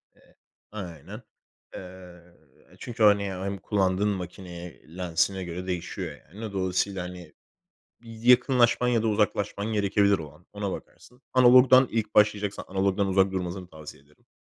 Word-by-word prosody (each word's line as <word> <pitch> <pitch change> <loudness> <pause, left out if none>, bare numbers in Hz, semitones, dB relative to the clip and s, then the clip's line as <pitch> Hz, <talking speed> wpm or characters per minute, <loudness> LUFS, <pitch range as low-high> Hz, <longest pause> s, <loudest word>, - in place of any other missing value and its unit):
Eee, - - -26 0.4
aynen. 95 - -8 0.5
Eee, 90 -1 -11 0.6
çünkü 115 -2 -3
hani 100 -1 +5
hem 100 +2 -4
kullandığın 95 +1 0
makineye, 90 -3 -8
lensine 90 +1 0
göre 90 +2 -6
değişiyor 90 -2 -5
yani. 105 - -11
D 110 -3 -6
dolayısıyla 95 0 -1
hani 90 -3 -10 0.7
bir 115 - -13
yakınlaşman 125 0 +4
ya 115 -2 +2
da 115 - 0
uzaklaşman 105 0 -1
gerekebilir 100 -1 +2
o 75 -3 -9
an, 85 - -23
ona 100 -2 -4
bakarsın. 125 +2 -12
Analogdan 130 0 +6
ilk 110 -2 -2
başlayacaksan 105 -1 +2
analogdan 95 +1 0
uzak 95 0 +2
durmasını 90 0 -4
tavsiye 75 -3 -12
ederim. 75 +1 -29
100 Hz, 135 wpm, -26 LUFS, 90-105 Hz, 0.7 s, Analogdan